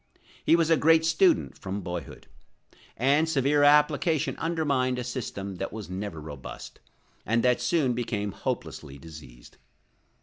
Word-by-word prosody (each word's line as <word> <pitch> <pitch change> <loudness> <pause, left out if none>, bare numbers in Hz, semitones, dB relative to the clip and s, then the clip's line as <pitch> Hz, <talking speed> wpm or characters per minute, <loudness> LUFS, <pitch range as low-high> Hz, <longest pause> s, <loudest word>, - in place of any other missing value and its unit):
He - - +5
was 165 -1 +2
a 165 - +5
great 160 +1 +4
student 335 - +2
from 100 +1 -4
boyhood; 90 -2 -7 0.7
and 145 +6 +2
severe 145 0 +2
application 150 +1 +3
undermined 145 -6 0
a 125 - -3
system 100 -6 -5
that 95 - -4
was 105 -4 -8
never 95 -3 -5
robust, 75 -4 -9 0.4
and 115 +1 +1
that 125 -1 +2
soon 150 -8 +1
became 110 -4 -2
hopelessly 70 -5 -5
diseased. 70 -5 -13
125 Hz, 135 wpm, -27 LUFS, 95-150 Hz, 0.7 s, He